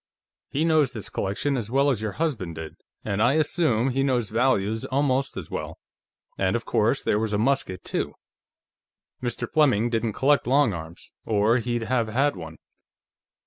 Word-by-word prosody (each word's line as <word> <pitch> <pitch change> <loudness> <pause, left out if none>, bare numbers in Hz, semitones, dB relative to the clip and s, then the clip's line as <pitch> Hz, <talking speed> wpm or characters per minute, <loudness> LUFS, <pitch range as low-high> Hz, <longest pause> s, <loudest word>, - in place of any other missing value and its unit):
He 150 +4 0
knows 155 -5 +3
this 110 -4 -5
collection 100 +9 -1
as 115 -5 -3
well 140 +3 +3
as 115 -5 -2
your 110 -2 -3
husband 115 - -2
did, 80 -1 -7 0.3
and 100 +1 -1
I 120 +4 +4
assume 145 -5 +1
he 135 +2 0
knows 125 -6 +1
values 110 -3 +1
almost 135 -1 0
as - - -7
well.... - - -5 0.6
And, - - +1
of - - -2
course, - - +1
there 105 - +1
was 110 -1 -1
a - - +2
musket, 110 -6 0
too; - - -3 1.1
Mr. 120 -1 -3
Fleming 120 -7 +2
didn't 115 -1 0
collect 140 +3 +2
long 135 -3 +3
arms, 80 0 -9
or 110 +3 +2
he'd 120 0 -2
have 115 -1 0
had 135 +6 +1
one. 80 -3 -9
120 Hz, 170 wpm, -25 LUFS, 105-135 Hz, 1.1 s, I